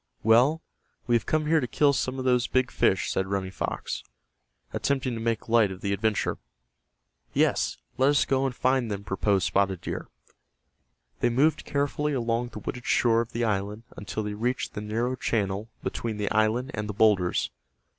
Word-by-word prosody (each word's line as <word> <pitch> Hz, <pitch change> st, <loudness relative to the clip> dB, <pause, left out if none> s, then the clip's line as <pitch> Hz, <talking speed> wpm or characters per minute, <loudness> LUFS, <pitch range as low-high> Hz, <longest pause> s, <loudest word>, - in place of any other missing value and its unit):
"Well, 125 Hz, +9 st, +4 dB, 0.4 s
we 120 Hz, -, 0 dB
have 115 Hz, -, 0 dB
come 155 Hz, -1 st, +1 dB
here 160 Hz, +1 st, +4 dB
to 125 Hz, -, -2 dB
kill 145 Hz, +3 st, +3 dB
some 130 Hz, -1 st, -1 dB
of 130 Hz, -, -4 dB
those 125 Hz, -1 st, +3 dB
big 130 Hz, -1 st, +1 dB
fish," 95 Hz, -, +2 dB
said 95 Hz, -, 0 dB
Running 95 Hz, -1 st, -2 dB
Fox, -, -, -3 dB, 0.7 s
attempting 130 Hz, -2 st, 0 dB
to 115 Hz, -, -4 dB
make 115 Hz, -1 st, -1 dB
light 115 Hz, -3 st, +4 dB
of 95 Hz, -, -8 dB
the 100 Hz, 0 st, 0 dB
adventure. 105 Hz, +1 st, 0 dB, 1.0 s
"Yes, -, -, +2 dB, 0.2 s
let 135 Hz, +2 st, +5 dB
us 145 Hz, -, +3 dB
go 135 Hz, 0 st, +1 dB
and 130 Hz, -, -5 dB
find 130 Hz, -2 st, +1 dB
them," 100 Hz, -1 st, -4 dB
proposed 100 Hz, 0 st, +1 dB
Spotted 95 Hz, -2 st, +1 dB
Deer. -, -, -5 dB, 1.1 s
They 120 Hz, -, +2 dB
moved 150 Hz, +6 st, +2 dB
carefully 145 Hz, +1 st, -1 dB
along 120 Hz, -1 st, 0 dB
the 120 Hz, -, -10 dB
wooded 120 Hz, +3 st, -6 dB
shore 115 Hz, -1 st, +3 dB
of 115 Hz, -, -6 dB
the 120 Hz, -, -2 dB
island 105 Hz, +1 st, -2 dB
until 105 Hz, +1 st, -4 dB
they 105 Hz, 0 st, -3 dB
reached 120 Hz, +4 st, -2 dB
the 105 Hz, -, -5 dB
narrow 115 Hz, +4 st, -1 dB
channel 105 Hz, -3 st, -1 dB
between 115 Hz, -2 st, -3 dB
the 105 Hz, -1 st, -2 dB
island 110 Hz, +5 st, +1 dB
and 105 Hz, 0 st, -4 dB
the -, -, -2 dB
boulders. 100 Hz, -4 st, +2 dB
115 Hz, 180 wpm, -27 LUFS, 105-130 Hz, 1.1 s, let